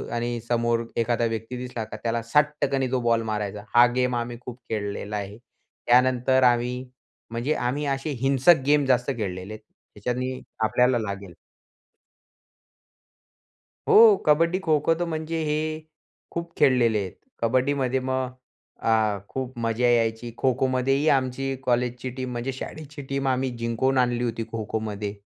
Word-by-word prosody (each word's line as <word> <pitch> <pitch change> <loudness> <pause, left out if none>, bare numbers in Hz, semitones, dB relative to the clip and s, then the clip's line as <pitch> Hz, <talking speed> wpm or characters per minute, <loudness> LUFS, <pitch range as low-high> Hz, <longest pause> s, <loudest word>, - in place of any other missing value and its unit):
आणि 120 0 -2
समोर 115 -1 +1
एखादा 120 0 +1
व्यक्ती 115 +2 -3
दिसला 125 -2 -5
का - - -8
त्याला 115 0 0
सटक्कनी 140 0 +1
तो 130 - +1
बॉल 115 -1 +2
मारायचा 105 -1 -3
हा 120 +1 +9
गेम 125 -1 +1
आम्ही 120 0 -3
खूप 125 0 -9
खेळलेला 105 -1 -3
आहे. 100 +1 -6 0.5
त्यानंतर 130 +1 +4
आम्ही 120 0 +3 0.6
म्हणजे 120 +6 -1
आम्ही 140 +5 -1
असे 135 +3 -5
हिंसक 135 +3 +5
गेम 145 0 +4
जास्त 130 0 +2
खेळलेले 95 -1 -4
आहेत 110 0 -11 0.3
त्याच्याने 125 +4 -3 0.3
आपल्याला 125 +2 +3
लागेल. 100 -4 -5 2.5
हो. 220 -1 +8
कबड्डी, 165 +4 +3
खो-खो 155 0 +3
तर 175 +1 -2
म्हणजे 160 +1 -3
हे 150 0 0 0.7
खूप 170 0 -5
खेळलेले 125 -6 +4
आहेत. 95 -3 -5 0.3
कबड्डीमध्ये 130 +2 +1
मग 130 0 -2 0.6
अ, 110 -2 +2
खूप 130 -1 -5
मजा 115 +2 +1
यायची. 115 0 +1
खो-खोमध्येही 130 +2 +1
आमची 135 +1 -2
कॉलेजची 125 0 0
टीम 130 -1 -3
म्हणजे 120 +2 -3
शाळेची 145 +2 -8
टीम 135 0 -1
आम्ही 130 0 +1
जिंकून 115 +3 0
आणली 125 -1 +2
होती 115 -1 -2
खो-खोमध्ये. 105 -2 -3
125 Hz, 135 wpm, -25 LUFS, 115-135 Hz, 2.5 s, हा